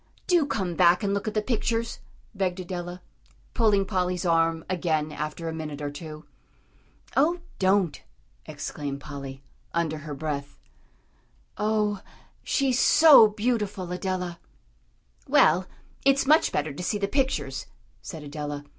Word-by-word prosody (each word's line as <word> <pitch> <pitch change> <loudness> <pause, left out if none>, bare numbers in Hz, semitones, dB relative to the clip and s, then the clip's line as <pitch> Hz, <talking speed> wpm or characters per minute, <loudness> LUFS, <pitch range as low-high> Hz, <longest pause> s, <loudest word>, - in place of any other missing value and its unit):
"Do 345 -5 +3
come 190 -10 -2
back 175 +1 +4
and 200 0 +1
look 200 +1 -2
at 215 - -3
the 215 - +1
pictures," 230 0 -1 0.3
begged 190 -3 -1
Adela, 175 0 -6 0.5
pulling 210 -4 +3
Polly's 180 -2 -1
arm 165 -1 +2
again 160 -4 0
after 150 +2 -5
a 160 - -3
minute 155 -2 -5
or 145 -1 -3
two. 155 +1 -9 0.9
"Oh, 335 +5 +3 0.2
don't!" 190 -3 +2 0.5
exclaimed 140 -2 -5
Polly, 140 -2 -8 0.3
under 160 -2 0
her 150 -1 -7
breath. 140 -1 -4 1.0
"Oh, 210 -1 0 0.4
she's 265 -3 +1
so 305 -8 +8
beautiful, 210 -4 -2
Adela!" 180 -1 -3 0.9
"Well, 185 +1 +4 0.4
it's 275 0 +4
much 310 +3 +4
better 150 0 -1
to 145 - -7
see 180 +4 -1
the 200 -1 -1
pictures," 265 +4 -1 0.3
said 160 -4 -8
Adela. 145 0 -5
180 Hz, 130 wpm, -26 LUFS, 155-210 Hz, 1.0 s, so